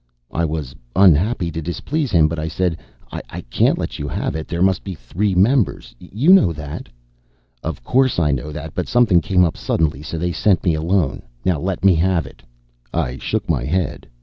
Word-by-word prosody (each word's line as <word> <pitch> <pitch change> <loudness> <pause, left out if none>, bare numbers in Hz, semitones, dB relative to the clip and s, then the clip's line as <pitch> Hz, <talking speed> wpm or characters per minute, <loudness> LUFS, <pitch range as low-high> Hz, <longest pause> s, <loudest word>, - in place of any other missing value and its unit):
I 85 - 0
was 75 -5 -4 0.2
unhappy 95 0 +4
to 80 - -4
displease 125 - -2
him, 85 -7 +4
but 80 0 -3
I 80 - -2
said, 85 0 -1 0.3
"I - - -7
can't - - +3
let - - -4
you - - -3
have - - -3
it. 80 - -4
There 85 +1 -1
must 95 -2 +2
be 95 -2 -6
three 95 +5 -2
members. 100 - +2
You 120 - +3
know 100 - +5
that." 75 -1 -7 0.7
"Of - - -5
course, 130 - +2
I 75 -4 +2
know 70 +2 -2
it. 75 +1 -7
But 90 - -3
something 115 -8 +4
came 90 +3 +3
up 80 - -2
suddenly, 75 -4 0
so 75 +2 -5
they 90 +2 -1
sent 90 +2 +2
me 85 - +2
alone. 85 +3 0 0.2
Now, 90 -5 +1
let 95 +3 -2
me 95 - +7
have 85 -1 +1
it." 65 - -14 0.5
I 70 -6 -2
shook - - -2
my 70 -7 0
head. 85 +3 -2
85 Hz, 200 wpm, -20 LUFS, 80-95 Hz, 0.7 s, me